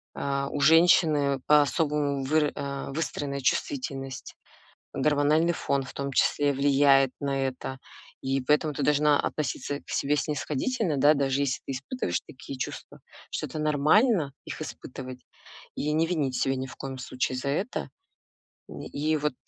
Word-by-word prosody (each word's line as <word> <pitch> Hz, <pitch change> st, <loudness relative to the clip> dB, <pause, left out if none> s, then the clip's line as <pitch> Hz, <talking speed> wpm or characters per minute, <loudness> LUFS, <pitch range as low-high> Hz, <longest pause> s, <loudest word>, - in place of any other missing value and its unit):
а, 140 Hz, 0 st, -1 dB
у 145 Hz, -, -4 dB
женщины 155 Hz, -4 st, +5 dB
по-особому 145 Hz, -1 st, +2 dB
выра 150 Hz, +1 st, +2 dB
а, 140 Hz, -1 st, -4 dB
выстроенная 140 Hz, -2 st, -3 dB
чувствительность. 135 Hz, -, -2 dB, 0.6 s
Гормональный 150 Hz, +4 st, +2 dB
фон 140 Hz, -3 st, -1 dB
в -, -, -10 dB
том 140 Hz, 0 st, -3 dB
числе 145 Hz, +2 st, +2 dB
влияет 135 Hz, -1 st, +4 dB
на 135 Hz, -1 st, 0 dB
это. 130 Hz, +1 st, -6 dB, 0.4 s
И 135 Hz, +1 st, -1 dB
поэтому 150 Hz, +3 st, +2 dB
ты -, -, -3 dB
должна 150 Hz, 0 st, +3 dB
относиться 145 Hz, -1 st, -3 dB
к -, -, -33 dB
себе 145 Hz, +2 st, +1 dB
снисходительно, 155 Hz, -, -1 dB
да, 145 Hz, +3 st, +5 dB
даже 140 Hz, -1 st, 0 dB
если 135 Hz, -2 st, 0 dB
ты -, -, -3 dB
испытываешь 140 Hz, -, -3 dB
такие 135 Hz, 0 st, -10 dB
чувства, 130 Hz, -, -6 dB, 0.3 s
что -, -, -3 dB
это -, -, -6 dB
нормально 155 Hz, -, +3 dB
их -, -, -7 dB
испытывать, 130 Hz, -3 st, -8 dB, 0.6 s
и 150 Hz, -, -2 dB
не 160 Hz, +2 st, +2 dB
винить 145 Hz, -7 st, -1 dB
себя 135 Hz, -, +1 dB
ни 130 Hz, -, -3 dB
в 130 Hz, -, -11 dB
коем 135 Hz, -1 st, -6 dB
случае 130 Hz, 0 st, -2 dB
за 140 Hz, +2 st, -3 dB
это. 190 Hz, -, -2 dB, 0.8 s
И 150 Hz, +2 st, -4 dB
и -, -, +2 dB
вот 150 Hz, -1 st, -1 dB
140 Hz, 150 wpm, -27 LUFS, 135-150 Hz, 0.8 s, женщины